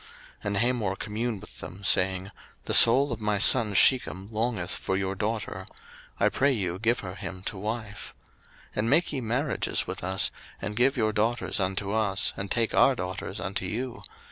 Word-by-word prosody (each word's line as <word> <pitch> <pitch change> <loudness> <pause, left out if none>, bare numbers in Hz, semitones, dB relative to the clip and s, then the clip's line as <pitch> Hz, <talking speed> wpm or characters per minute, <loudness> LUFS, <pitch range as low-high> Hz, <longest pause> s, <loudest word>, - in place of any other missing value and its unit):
01:034:008 - - -18 0.4
And 100 -1 0
Hamor 115 -3 0
communed 110 0 -4
with - - -13
them, 95 +3 -9
saying, 95 0 +2 0.3
The - - -2
soul 135 +5 +7
of 115 -1 -5
my 105 -1 0
son 110 -1 +5
Shechem 100 -5 +3
longeth 110 -5 -2
for 95 - -2
your 95 0 -2
daughter: 105 -2 -4 0.5
I - - +4
pray 140 +1 +2
you 95 -7 -2
give 120 +3 +1
her 90 -2 -7
him 95 -1 -7
to 100 - -4
wife. 110 0 -6 0.5
01:034:009 - - -17
And 110 +2 0
make 160 +3 +3
ye 135 - -2
marriages 125 +4 -1
with - - -6
us, 95 +1 +3 0.3
and 105 +2 -5
give 130 +4 +2
your 110 -2 +1
daughters 110 +3 0
unto 95 +1 -2
us, 105 -2 +1
and 100 0 -5
take 115 0 0
our 135 - +4
daughters 95 -1 -5
unto 95 +2 -3
you. 120 +6 -4
105 Hz, 185 wpm, -27 LUFS, 95-120 Hz, 0.5 s, soul